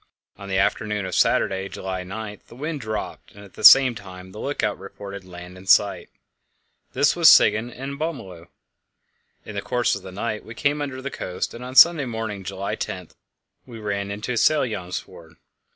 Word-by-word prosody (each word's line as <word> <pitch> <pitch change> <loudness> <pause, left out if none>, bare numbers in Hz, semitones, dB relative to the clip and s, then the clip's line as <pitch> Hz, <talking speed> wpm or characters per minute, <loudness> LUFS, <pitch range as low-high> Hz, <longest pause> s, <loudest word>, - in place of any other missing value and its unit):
On 100 0 -10
the 95 - 0
afternoon 105 +1 0
of 95 - -5
Saturday, 95 +2 +1
July 95 -1 -5
9, 105 +2 -7
the - - -14
wind 150 +2 -4
dropped, 110 -2 -6
and 100 0 -12
at 100 - -18
the - - -10
same 135 -2 +9
time 95 -3 -11
the 105 - -10
lookout 115 -7 -2
reported 100 0 -9
land 90 0 -11
in 95 - -15
sight. 100 +1 +3 0.8
This - - +3
was - - +7
Siggen 110 +3 +5
on 140 +2 -6
Bömmelö. 95 - -5 1.0
In 110 - -8
the 100 - -3
course 120 +4 0
of 100 - -7
the 95 0 -10
night 105 +3 -4
we 115 - -11
came 145 +2 0
under 130 -2 -5
the 140 - -4
coast, 90 - -4
and 120 - -9
on 130 +1 -8
Sunday 165 -1 +7
morning, 110 -4 -5
July 95 +1 -4
10, - - -5 0.6
we 120 -2 -10
ran 100 -2 -3
into 105 +5 -4
Sælbjömsfjord. 100 - -1
105 Hz, 180 wpm, -23 LUFS, 95-125 Hz, 1.0 s, same